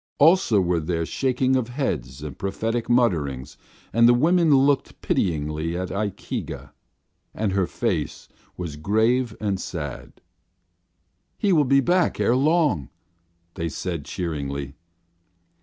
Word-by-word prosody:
Also 150 - +5
were 90 -2 +1
there 80 +1 -2
shaking 130 +5 +1
of 125 -3 0
heads 75 - -3
and 75 -3 -6
prophetic 115 +4 -2
mutterings, 80 - +1 0.4
and 115 +1 +6
the 120 - +6
women 165 +5 +3
looked 140 0 +2
pityingly 80 0 -1
at 90 0 -3
Ikeega, 100 0 -4 0.6
and 105 -2 -1
her 95 -2 +1
face - - -2 0.3
was 85 -5 -5
grave 110 +7 +1
and 100 -3 -1
sad. 75 -5 -6 1.2
"He 200 -2 +2
will 150 -4 +4
be 135 +1 +4
back 175 +5 +1
ere 120 - +3
long," 140 - +2 0.6
they 85 0 -3
said 85 -2 -4
cheeringly. 70 -5 -4
100 Hz, 125 wpm, -24 LUFS, 80-130 Hz, 1.2 s, and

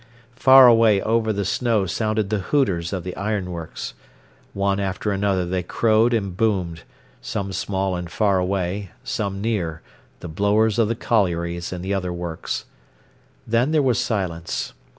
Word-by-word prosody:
Far 130 0 +8
away 115 -4 +5
over 110 +2 +1
the 100 -1 -2
snow 110 0 +1
sounded 110 +2 -1
the 105 - +1
hooters 95 - 0
of 95 -3 -3
the 90 0 -6
ironworks. 95 -5 -4 0.6
One 100 0 0
after 100 +1 -2
another 100 -2 0
they 90 +1 -1
crowed 110 +5 +2
and 100 -6 -1
boomed, 90 -6 0 0.4
some 100 -2 -4
small 95 0 -1
and 90 -1 -5
far 100 +1 +2
away, 95 +1 -2
some 100 -2 -3
near, 90 -8 -2 0.4
the - - -7
blowers 100 +6 +1
of 115 - +4
the 115 - -1
collieries 85 -7 0
and 90 0 -5
the 100 - -1
other 90 -2 -2
works. 85 -2 -4 0.8
Then 120 +7 +1
there 155 -2 +3
was 125 -4 +2
silence. 90 -6 -2
100 Hz, 150 wpm, -22 LUFS, 90-110 Hz, 0.8 s, Far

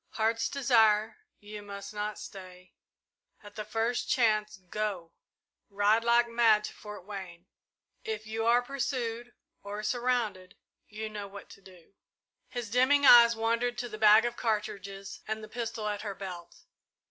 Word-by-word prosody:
"Heart's 225 +1 0
Desire, 225 -5 +3 0.2
you 210 0 -9
must 200 0 -9
not 210 0 -4
stay. 185 -2 -11 0.7
At 205 0 -12
the 215 - -5
first 225 +3 -2
chance, 215 -3 +1
go 190 -2 -4 0.6
ride 205 +3 +2
like 235 0 +4
mad 230 -2 +3
to - - -5
to - - -18
Fort 210 -3 -10
Wayne 185 -4 -9 0.6
if 220 -1 -4
you 220 +1 -3
are 240 +1 +4
pursued 245 -3 -3 0.3
or 205 +1 -6
surrounded 230 -6 -1 0.3
you 220 +1 -6
know 210 -2 -6
what 200 0 -12
to - - -15
do!" 185 -1 -18 0.6
His 240 -4 -6
dimming 270 +4 +4
eyes 235 -2 +9
wandered 230 +2 0
to 245 0 -4
the 215 -1 -8
bag 215 +1 +7
of 240 0 -2
cartridges 200 -3 -4
and 220 0 -4
the - - -8
pistol 225 -1 -4
at 205 -1 -3
her 205 -2 -5
belt. 180 -3 -8
215 Hz, 155 wpm, -29 LUFS, 205-235 Hz, 0.7 s, eyes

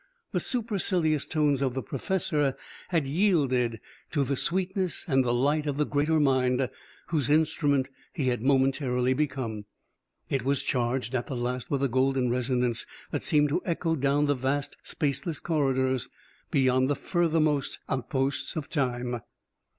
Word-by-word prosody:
The - - +1
supercilious 185 - +1
tones 145 -3 +1
of 130 -2 0
the 130 - -2
professor 150 -2 0 0.3
had 165 -5 +1
yielded 135 - +2 0.3
to 145 -3 +1
the 140 +1 -1
sweetness 185 +3 -1
and 135 -4 +3
the 120 - 0
light 145 +5 +1
of 140 -1 -1
the 150 - +2
Greater 150 +2 +1
Mind 130 -2 +2 0.4
whose 150 -7 0
instrument 150 -3 +2 0.2
he 130 -4 0
had 120 -2 -1
momentarily 130 -1 +2
become. 130 -7 -2 0.6
It 135 - -1
was 140 +1 0
charged 125 0 -1
at 125 -2 -1
the 135 - -4
last 125 +1 -3
with 140 -1 0
a - - +4
golden 130 0 +1
resonance 125 -1 0 0.2
that - - -1
seemed 150 -1 +3
to 155 - 0
echo 165 -1 0
down 140 +1 +2
vast 135 +2 -1
spaceless 145 +2 -2
corridors 130 -5 0 0.4
beyond 130 0 +3
the 145 - +2
furthermost 155 -5 +1
outposts 135 +3 -1
of 155 -3 -5
time. 125 -4 -1
140 Hz, 145 wpm, -28 LUFS, 130-155 Hz, 0.6 s, a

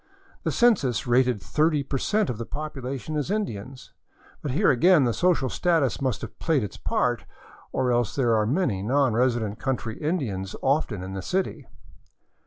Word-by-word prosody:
The - - -1
census 180 - +2
rated 125 -3 +2
30% 155 - +1
of 115 - -7
the 115 - -4
population 140 -1 -5
as 150 +1 -2
Indians; 135 - -4 0.5
but 145 - -4
here 170 +10 +3
again 155 +5 +5
the 120 -2 +1
social 175 -5 +2
status 160 -3 +1
must 130 -2 -1
have - - -8
played 155 -7 +1
its 100 - -6
part, - - -1 0.5
or 130 -1 0
else 120 -2 0
there 120 -5 +2
are 105 -1 +2
many 130 - 0
non 130 +3 +2
resident 115 -3 0
country 125 -4 -3
Indians 120 - -2
often 135 -8 0
in 95 +1 -6
the 95 - -4
city. 180 - -2
130 Hz, 160 wpm, -25 LUFS, 115-155 Hz, 0.5 s, again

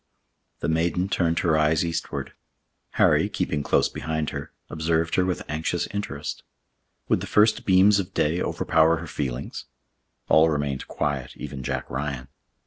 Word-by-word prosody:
The - - -1
maiden 85 +3 0
turned 85 -4 +1
her 80 -2 +3
eyes 80 +2 +2
eastward. 85 -1 -4 0.6
Harry, - - +3
keeping 75 - -1
close - - +2
beside 80 -1 -3
her, - - -6 0.2
observed 80 +1 0
her 95 - +3
with 90 -1 -2
anxious 80 +3 -1
interest. 75 -8 -4 0.7
Would - - +2
the - - -5
first 110 +1 +3
beams 100 +2 +6
of 95 - -4
day 80 +4 +1
overpower 80 0 +2
her 85 - -6
feelings? 70 -4 -4 0.6
All 80 +1 +5
remained 70 -3 -2
quiet, 70 -3 -3
even 70 - -6
Jack - - -3
Ryan. 65 -2 -4
80 Hz, 145 wpm, -25 LUFS, 75-85 Hz, 0.7 s, beams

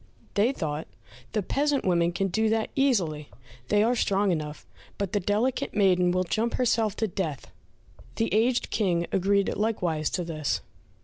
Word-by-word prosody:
They 215 +5 +3
thought, 155 - -4 0.5
"The 210 -2 0
peasant 285 +6 0
women 170 -2 +2
can 195 +2 -1
do 220 +4 +1
that 220 0 0
easily; 180 - +1 0.4
they 205 +7 +3
are 240 +3 +2
strong 200 -3 +2
enough, 150 -2 -4 0.3
but 200 -2 -2
the 205 - +2
delicate 225 +8 0
maiden 180 -3 +4
will 185 +1 +1
jump 220 +7 -1
herself 225 -4 +1
to 220 - 0
death." 165 -7 -4 0.6
The 225 - -1
aged 235 +3 +2
King 175 -6 +1
agreed 200 +1 +2
likewise 180 -8 0
to 180 - -2
this. 155 -4 -2
200 Hz, 160 wpm, -27 LUFS, 170-225 Hz, 0.6 s, maiden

